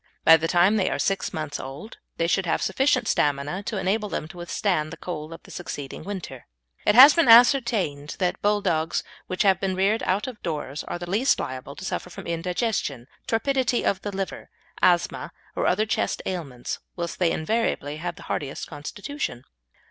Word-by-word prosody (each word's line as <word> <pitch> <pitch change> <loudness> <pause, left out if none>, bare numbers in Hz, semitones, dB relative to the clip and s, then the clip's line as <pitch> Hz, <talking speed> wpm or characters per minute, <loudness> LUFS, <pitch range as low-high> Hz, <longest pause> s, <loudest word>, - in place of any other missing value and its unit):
By 165 - +10
the 165 0 0
time 180 +5 +4
they 190 - +2
are - - -1
six 195 -1 0
months 155 -2 -4
old 135 +11 -8 0.2
they 165 - +1
should 180 +2 +1
have 160 - +1
sufficient 255 +3 +2
stamina 145 +5 0
to 215 - -2
enable 200 +3 0
them 155 - -3
to 175 - -12
withstand 175 -2 -1
the 165 - -8
cold 155 -3 -6
of 165 - -10
the - - -14
succeeding 145 -6 -6
winter. 180 -11 -7 0.4
It 210 - +5
has 275 +5 +11
been 335 -6 +3
ascertained 230 - +5
that 180 -2 -1
Bulldogs 195 -6 +1 0.2
which 185 +3 0
have 190 -2 +4
been 190 -1 -1
reared 200 +4 +2
out 190 +3 0
of 250 -5 -8
doors 150 -2 -4
are - - -4
the 175 0 -7
least 215 +9 +2
liable 130 +2 -5
to - - -8
suffer 180 - -3
from - - -9
indigestion, 170 - -2 0.2
torpidity 255 +1 +1
of 195 - +1
the 205 - -4
liver, 195 -1 -5 0.3
asthma 175 -1 +2 0.2
or - - 0
other 210 +4 +2
chest 220 - -1
ailments, 140 -10 -4 0.2
whilst 170 -1 -4
they 175 -2 +3
invariably 155 -6 -1
have 175 +2 -4
the - - -12
hardiest 140 -2 -4
constitution. 155 - -5
180 Hz, 185 wpm, -25 LUFS, 155-210 Hz, 0.4 s, has